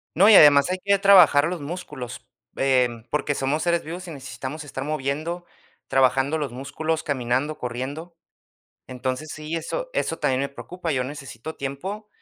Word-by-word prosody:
No, 195 Hz, +5 st, +6 dB
y -, -, +8 dB
además 145 Hz, 0 st, +8 dB
hay 185 Hz, -, -2 dB
que 200 Hz, 0 st, +3 dB
trabajar 180 Hz, -8 st, +7 dB
los 175 Hz, -3 st, -4 dB
músculos, 140 Hz, -6 st, -7 dB, 0.3 s
em, 125 Hz, -4 st, +1 dB
porque 145 Hz, -1 st, 0 dB
somos 140 Hz, +4 st, 0 dB
seres 170 Hz, -1 st, +1 dB
vivos 175 Hz, +3 st, -7 dB
y -, -, -7 dB
necesitamos 140 Hz, +1 st, -7 dB
estar 135 Hz, -2 st, -6 dB
moviendo, 155 Hz, +4 st, -3 dB, 0.4 s
trabajando 135 Hz, +3 st, +2 dB
los 140 Hz, -5 st, -3 dB
músculos, 150 Hz, +5 st, -3 dB
caminando, 130 Hz, +2 st, -1 dB
corriendo. 140 Hz, +8 st, -5 dB, 0.7 s
Entonces 130 Hz, +4 st, -4 dB
sí, 155 Hz, +2 st, -5 dB
eso -, -, -4 dB
eso 165 Hz, -, -1 dB
también 130 Hz, 0 st, +1 dB
me 140 Hz, -, -1 dB
preocupa. 170 Hz, +3 st, -5 dB
Yo 130 Hz, -2 st, 0 dB
necesito 140 Hz, +1 st, -8 dB
tiempo 190 Hz, +11 st, -5 dB
145 Hz, 155 wpm, -24 LUFS, 135-165 Hz, 0.7 s, y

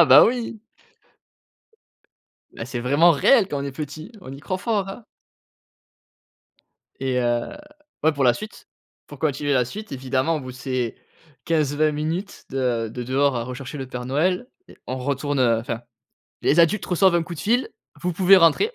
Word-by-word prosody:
Ah -, -, +6 dB
bah, 140 Hz, -1 st, +9 dB
oui. 230 Hz, -2 st, -3 dB, 1.9 s
Bah, 115 Hz, -, -7 dB
c'est 125 Hz, -2 st, -4 dB
vraiment 145 Hz, +8 st, +5 dB
réel 195 Hz, -, +4 dB
quand 145 Hz, -5 st, -3 dB
on -, -, -4 dB
est 140 Hz, -, -4 dB
petit, 155 Hz, -, -7 dB
on 130 Hz, -, -9 dB
y 135 Hz, -, -9 dB
croit 185 Hz, +5 st, -3 dB
fort, 200 Hz, -1 st, -1 dB
hein? 205 Hz, +4 st, -8 dB, 2.0 s
Et 130 Hz, -1 st, 0 dB
heu, 120 Hz, -1 st, 0 dB, 0.5 s
ouais, 160 Hz, +1 st, +4 dB
pour 140 Hz, -2 st, 0 dB
la 120 Hz, -, +5 dB
suite, 215 Hz, +1 st, -9 dB, 0.4 s
pour -, -, -12 dB
continuer 145 Hz, -2 st, 0 dB
la 130 Hz, -2 st, +3 dB
suite, 210 Hz, -, -8 dB
évidemment 130 Hz, +4 st, 0 dB
au -, -, -4 dB
bout 130 Hz, -1 st, -8 dB
de 125 Hz, -, -13 dB
ces 125 Hz, -2 st, -3 dB, 0.5 s
15-20 155 Hz, -1 st, +1 dB
minutes 160 Hz, +6 st, -4 dB
de 125 Hz, -4 st, -1 dB
de 125 Hz, -, -5 dB
dehors 135 Hz, +2 st, +1 dB
à 115 Hz, -, -2 dB
rechercher 130 Hz, +3 st, -7 dB
le 135 Hz, -, -5 dB
Père 125 Hz, -1 st, -6 dB
Noël 180 Hz, -, 0 dB, 0.2 s
et -, -, -15 dB
on 130 Hz, -, -3 dB
retourne, 140 Hz, +1 st, -1 dB
heu, 115 Hz, -3 st, +3 dB
enfin, 115 Hz, 0 st, -4 dB, 0.6 s
les 155 Hz, -, +4 dB
adultes 170 Hz, +6 st, +3 dB
reçoivent 185 Hz, 0 st, +3 dB
un 170 Hz, -, +3 dB
coup 170 Hz, +1 st, -7 dB
de -, -, -7 dB
fil: 240 Hz, -, +1 dB, 0.3 s
«Vous 180 Hz, 0 st, 0 dB
pouvez 190 Hz, +3 st, +6 dB
rentrer». 185 Hz, -, +4 dB
145 Hz, 180 wpm, -23 LUFS, 130-180 Hz, 2.0 s, bah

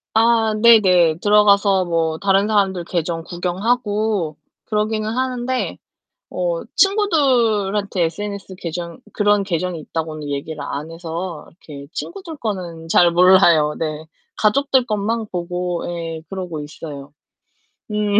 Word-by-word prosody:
아 225 Hz, -1 st, +3 dB
네네. 185 Hz, -8 st, +6 dB
들어가서 200 Hz, -2 st, +4 dB
뭐 165 Hz, -2 st, -1 dB
다른 195 Hz, 0 st, +2 dB
사람들 195 Hz, -4 st, +1 dB
계정 165 Hz, -1 st, -2 dB
구경하고 205 Hz, 0 st, -1 dB, 0.3 s
그러기는 215 Hz, 0 st, -1 dB
하는데 255 Hz, +1 st, -2 dB, 0.5 s
어 -, -, -2 dB
친구들한테 235 Hz, -, +2 dB
SNS 200 Hz, +2 st, -5 dB
계정 170 Hz, -1 st, -6 dB
그런 205 Hz, -1 st, +2 dB
계정이 180 Hz, -2 st, -2 dB
있다고는 155 Hz, -1 st, -5 dB
얘기를 145 Hz, +2 st, -4 dB
안 145 Hz, +2 st, -5 dB
해서 165 Hz, 0 st, -6 dB, 0.2 s
이렇게 140 Hz, -2 st, -9 dB
친구들 345 Hz, -4 st, -7 dB
거는 180 Hz, -, -5 dB
잘 170 Hz, +1 st, +5 dB
몰라요. 170 Hz, -4 st, +5 dB
네. 155 Hz, -1 st, -4 dB, 0.3 s
가족들 260 Hz, +3 st, +2 dB
것만 215 Hz, +1 st, -1 dB
보고 175 Hz, 0 st, -3 dB
예 165 Hz, -2 st, -5 dB
그러고 180 Hz, -5 st, -5 dB
있어요. 145 Hz, -1 st, -9 dB, 0.8 s
음. 210 Hz, -1 st, +2 dB
190 Hz, 265 characters per minute, -20 LUFS, 165-215 Hz, 0.8 s, 네네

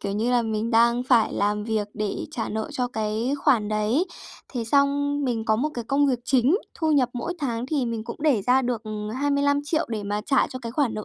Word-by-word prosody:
kiểu 200 Hz, -, -3 dB
như 225 Hz, +4 st, 0 dB
là, 245 Hz, -1 st, +3 dB
mình 220 Hz, 0 st, -2 dB
đang 235 Hz, +1 st, +4 dB
phải 245 Hz, -4 st, +3 dB
làm 210 Hz, +1 st, 0 dB
việc 215 Hz, -2 st, -1 dB
để 210 Hz, -2 st, -3 dB
trả 225 Hz, -, -3 dB
nợ 220 Hz, 0 st, -3 dB
cho 250 Hz, -1 st, -1 dB
cái 220 Hz, +2 st, -2 dB
khoản 240 Hz, -9 st, +2 dB
đấy. 215 Hz, +9 st, +1 dB, 0.5 s
Thế 240 Hz, -4 st, -2 dB
xong 285 Hz, +3 st, +2 dB
mình 235 Hz, -4 st, -1 dB
có 220 Hz, -1 st, +2 dB
một 275 Hz, +7 st, 0 dB
cái 240 Hz, -, -4 dB
công 280 Hz, +4 st, +2 dB
việc 255 Hz, -3 st, +1 dB
chính, 265 Hz, +6 st, +3 dB, 0.2 s
thu 315 Hz, -2 st, 0 dB
nhập 265 Hz, -4 st, +3 dB
mỗi 250 Hz, +8 st, -4 dB
tháng 245 Hz, -4 st, -2 dB
thì 275 Hz, -3 st, 0 dB
mình 230 Hz, -2 st, -3 dB
cũng -, -, -6 dB
để 270 Hz, -10 st, +3 dB
ra 255 Hz, +1 st, +4 dB
được 240 Hz, -3 st, -2 dB, 0.4 s
25.000.000 285 Hz, +2 st, +1 dB
để 220 Hz, -3 st, -3 dB
mà 205 Hz, +1 st, -2 dB
trả 275 Hz, -3 st, +3 dB
cho 255 Hz, -, -7 dB
cái 230 Hz, -1 st, -5 dB
khoản 270 Hz, -4 st, 0 dB
nợ 215 Hz, -, -5 dB
240 Hz, 230 wpm, -24 LUFS, 220-280 Hz, 0.5 s, đang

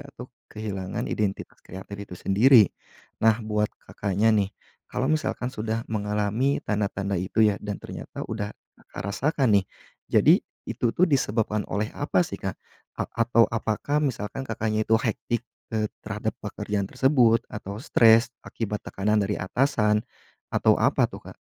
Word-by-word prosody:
atau 125 Hz, -2 st, -10 dB, 0.2 s
kehilangan 100 Hz, -3 st, -4 dB
identitas 100 Hz, -2 st, -2 dB
kreatif 95 Hz, +2 st, -10 dB
itu 100 Hz, -3 st, -8 dB
sendiri." 110 Hz, +6 st, +6 dB, 0.6 s
Nah 110 Hz, -1 st, +5 dB
buat 105 Hz, 0 st, 0 dB, 0.2 s
Kakaknya 100 Hz, +2 st, 0 dB
nih, 100 Hz, -2 st, +2 dB, 0.4 s
kalau 130 Hz, -, 0 dB
misalkan 155 Hz, -5 st, -1 dB
sudah 110 Hz, +2 st, -3 dB
mengalami 105 Hz, +5 st, 0 dB
tanda-tanda 100 Hz, -2 st, -1 dB
itu 95 Hz, +4 st, -1 dB
ya -, -, -5 dB
dan 105 Hz, -1 st, -3 dB
ternyata -, -, -7 dB
udah 105 Hz, -2 st, -3 dB, 0.3 s
Kakak -, -, -10 dB
rasakan 130 Hz, -4 st, +2 dB
nih, -, -, -10 dB, 0.4 s
jadi -, -, +6 dB, 0.3 s
itu 120 Hz, -, -1 dB
tuh 180 Hz, -, +6 dB
disebabkan 110 Hz, -6 st, +1 dB
oleh 105 Hz, +3 st, -1 dB
apa 150 Hz, +5 st, +1 dB
sih -, -, -6 dB
Kak? 95 Hz, -2 st, -3 dB, 0.4 s
A -, -, -1 dB
atau 115 Hz, 0 st, +4 dB
apakah 115 Hz, +6 st, -1 dB
misalkan 120 Hz, -2 st, -3 dB
Kakaknya 110 Hz, -2 st, -1 dB
itu 110 Hz, -, +4 dB
hectic, 115 Hz, 0 st, -1 dB, 0.3 s
eee, 110 Hz, -1 st, 0 dB, 0.2 s
terhadap -, -, -3 dB
pekerjaan 100 Hz, -1 st, -2 dB
tersebut 120 Hz, 0 st, +3 dB
atau 105 Hz, 0 st, -7 dB
stres 115 Hz, -5 st, +5 dB, 0.2 s
akibat 105 Hz, -2 st, -4 dB
tekanan 105 Hz, +2 st, 0 dB
dari 100 Hz, +1 st, -1 dB
atasan 105 Hz, -1 st, +1 dB, 0.5 s
atau -, -, +4 dB
apa -, -, +3 dB
tuh, -, -, -10 dB
Kak? -, -, -14 dB
110 Hz, 145 wpm, -26 LUFS, 105-115 Hz, 0.6 s, sendiri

